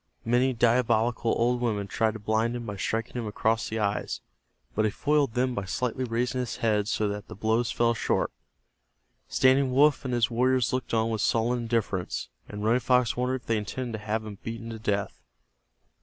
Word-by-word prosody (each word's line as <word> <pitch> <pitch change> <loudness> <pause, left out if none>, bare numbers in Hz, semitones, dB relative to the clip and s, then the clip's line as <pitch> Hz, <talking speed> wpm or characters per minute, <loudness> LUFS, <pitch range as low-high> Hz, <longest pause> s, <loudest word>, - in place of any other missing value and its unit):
Many 125 +3 +3
diabolical 115 -1 +2
old 120 +1 +1
women 105 -4 0
tried 110 +3 0
to - - -6
blind 110 +3 0
him 120 -1 -5
by 105 -2 -5
striking 110 +4 -2
him 115 -3 -3
across 110 +2 0
the 110 - -3
eyes, 105 -1 -1 0.5
but 110 - +1
he 110 - +3
foiled 145 +1 +1
them 125 +1 +1
by 100 -4 -3
slightly 125 +5 -2
raising 125 +2 -1
his 125 -2 -3
head 105 -3 +1
so 110 -1 0
that 105 0 -4
the - - -9
blows 110 +3 +1
fell 120 0 +2
short. 115 - 0 1.0
Standing 130 0 +3
Wolf 145 +2 +4
and 130 - -3
his 120 0 +2
warriors 125 0 +2
looked 130 -2 -1
on 110 0 +1
with 110 -2 -1
sullen 120 +2 +1
indifference, 115 -6 -2 0.2
and 105 0 -6
Running 115 +3 +3
Fox 125 -1 +2
wondered 125 +1 -1
if - - -30
they 115 - +1
intended 120 +4 -4
to - - -13
have 110 +1 -2
him 105 -2 -8
beaten 115 0 -6
to 110 - -7
death. 100 -2 -2
115 Hz, 195 wpm, -27 LUFS, 110-125 Hz, 1.0 s, Wolf